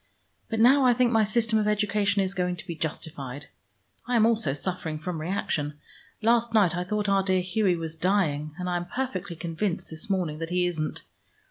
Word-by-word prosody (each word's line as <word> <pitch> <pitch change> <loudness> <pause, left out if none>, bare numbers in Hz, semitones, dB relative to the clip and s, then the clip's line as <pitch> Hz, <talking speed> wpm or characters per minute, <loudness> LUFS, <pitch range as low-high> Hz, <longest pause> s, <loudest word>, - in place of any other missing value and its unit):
But 225 - -2
now 265 +5 +6
I 250 -2 +5
think 245 -1 +3
my 225 -2 +4
system 220 +1 +2
of 210 - 0
education 205 -1 +2
is 190 0 -2
going 180 -1 -1
to 175 - -9
be 170 - -4
justified. 145 -4 -5 0.6
I 245 - 0
am 220 -2 +5
also 225 -10 +2
suffering 160 +1 -3
from 160 +1 -4
reaction. 155 -4 -2 0.5
Last 230 0 +3
night 190 -6 +4
I 180 - -1
thought 210 +1 -1
our 195 0 +3
dear 190 -1 +1
Hughie 185 0 +1
was 165 -1 -5
dying, 160 -5 0
and 180 -1 -4
I 175 -1 0
am 175 0 -5
perfectly 200 -7 -3
convinced 170 +3 -3
this 160 +5 -7
morning 175 -6 -1
that 165 0 -4
he 180 0 +1
isn't. 160 -3 -2
185 Hz, 200 wpm, -27 LUFS, 165-215 Hz, 0.6 s, now